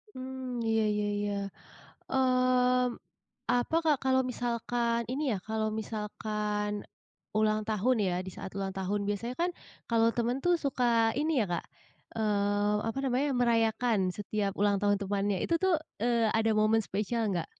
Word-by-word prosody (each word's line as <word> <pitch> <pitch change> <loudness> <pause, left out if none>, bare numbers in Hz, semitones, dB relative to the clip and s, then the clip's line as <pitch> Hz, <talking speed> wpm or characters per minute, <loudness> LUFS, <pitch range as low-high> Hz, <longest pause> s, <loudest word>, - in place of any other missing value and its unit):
Mmm, 255 -1 -5
iya 225 0 +2
iya 210 0 0
iya. 205 0 -1 0.8
Mmm, 255 -1 +3 0.7
apa 245 +5 +1
Kak 305 -2 +4
kalau 260 0 +4
misalkan 235 -1 -1
ini 285 - -2
ya, 205 - -1
kalau 220 0 0
misalkan 210 -1 -3 0.5
ulang 215 0 +3
tahun 220 +4 +2
ya, 180 - 0
di - - -5
saat 190 - -7
ulang 195 -1 -2
tahun 195 +2 -1
biasanya 220 +4 -2
kan 350 +1 +2 0.4
kalau 230 -1 +4
teman 240 +1 +1
tuh 355 0 +4
suka 260 -3 0 0.4
ini 315 +2 +1
ya - - +3
Kak, 170 - -2 0.5
eee, 205 -1 +1
apa 225 - -3
namanya, 265 +2 +1
merayakan 230 -1 +2 0.2
setiap 205 -1 -2
ulang 205 0 +3
tahun 205 0 +3
temannya 200 0 0
itu 335 - 0
tu, - - +4 0.4
eee, 235 -2 +3
ada 225 0 +2
momen 215 +1 +4
spesial 215 +4 -1
nggak? 170 -3 -1
225 Hz, 150 wpm, -30 LUFS, 205-250 Hz, 0.8 s, Kak